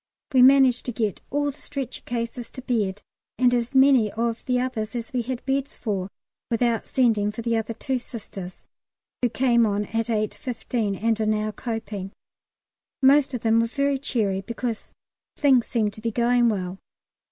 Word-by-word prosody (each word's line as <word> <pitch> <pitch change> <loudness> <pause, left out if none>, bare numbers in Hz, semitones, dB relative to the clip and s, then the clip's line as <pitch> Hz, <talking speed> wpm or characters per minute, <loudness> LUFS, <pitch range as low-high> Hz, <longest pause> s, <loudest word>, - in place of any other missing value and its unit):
We 255 - +6
managed 265 -1 +6
to - - 0
get 215 -4 -2
all 290 0 0
the 280 - -20
stretcher 275 -4 -5
cases 235 0 -4
to 255 - -8
bed, 210 -6 -1 0.3
and 250 -1 +4
as 240 +2 -1
many 265 -5 +5
of 230 0 -2
the 250 -1 +1
others 245 -3 -3
as 235 0 -5
we 250 - +1
had 250 +1 -5
beds 275 +2 -1
for, 195 -5 -3 0.4
without 235 -1 +1
sending 220 -5 +2
for 230 +2 -7
the 235 0 +1
other 225 0 -2
two 260 +3 -2
Sisters, 200 -6 -9 0.6
who 245 - +2
came 240 -1 +3
on 205 -1 +1
at 225 +2 -2
8.15, 220 -1 -2
and 225 -1 +2
are 215 - +1
now 215 0 0
coping. 210 -4 -5 0.9
Most 275 0 +5
of 240 - -4
them 225 0 +3
were 230 - +2
very 280 +2 0
cheery, 210 -8 -1
because 230 +2 -4 0.5
things 265 -5 +4
seem 220 -4 0
to 215 - -12
be 230 - -1
going 240 +1 +3
well. 190 -3 -3
235 Hz, 175 wpm, -24 LUFS, 215-255 Hz, 0.9 s, We